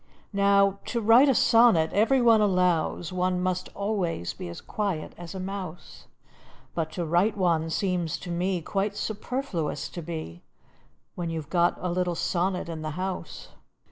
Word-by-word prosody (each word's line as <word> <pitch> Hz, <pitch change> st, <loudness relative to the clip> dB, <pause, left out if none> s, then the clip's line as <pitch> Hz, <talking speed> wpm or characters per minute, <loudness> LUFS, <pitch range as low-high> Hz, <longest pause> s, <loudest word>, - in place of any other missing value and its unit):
Now, 200 Hz, 0 st, +3 dB
to 235 Hz, -, -2 dB
write 230 Hz, +6 st, +6 dB
a 265 Hz, -, +3 dB
sonnet, 225 Hz, -11 st, +5 dB
every 240 Hz, +5 st, +3 dB
one 225 Hz, -2 st, +6 dB
allows, 180 Hz, -3 st, +1 dB
One 180 Hz, 0 st, 0 dB
must 185 Hz, 0 st, -1 dB
always 195 Hz, -, -2 dB
be 85 Hz, -, -7 dB
as 85 Hz, -, -7 dB
quiet 195 Hz, -7 st, -3 dB
as 175 Hz, +2 st, -9 dB
a -, -, -4 dB
mouse; 185 Hz, -3 st, -7 dB, 0.7 s
But 160 Hz, -2 st, -2 dB
to 175 Hz, -, -2 dB
write 180 Hz, +7 st, +2 dB
one 165 Hz, -4 st, +1 dB
seems 175 Hz, -2 st, -1 dB
to 180 Hz, -, -6 dB
me 180 Hz, 0 st, -1 dB
Quite 200 Hz, +4 st, -2 dB
superfluous 215 Hz, -, -3 dB
to 175 Hz, -, -7 dB
be, 155 Hz, -, -6 dB, 0.7 s
When 175 Hz, -2 st, -4 dB
you 165 Hz, -1 st, -2 dB
've 150 Hz, -1 st, -10 dB
got 175 Hz, -1 st, +2 dB
a 180 Hz, -, -2 dB
little 180 Hz, 0 st, 0 dB
sonnet 180 Hz, +1 st, -1 dB
in 165 Hz, -2 st, -5 dB
the 155 Hz, +1 st, -5 dB
house. 185 Hz, -3 st, -5 dB
180 Hz, 165 wpm, -27 LUFS, 170-200 Hz, 0.7 s, write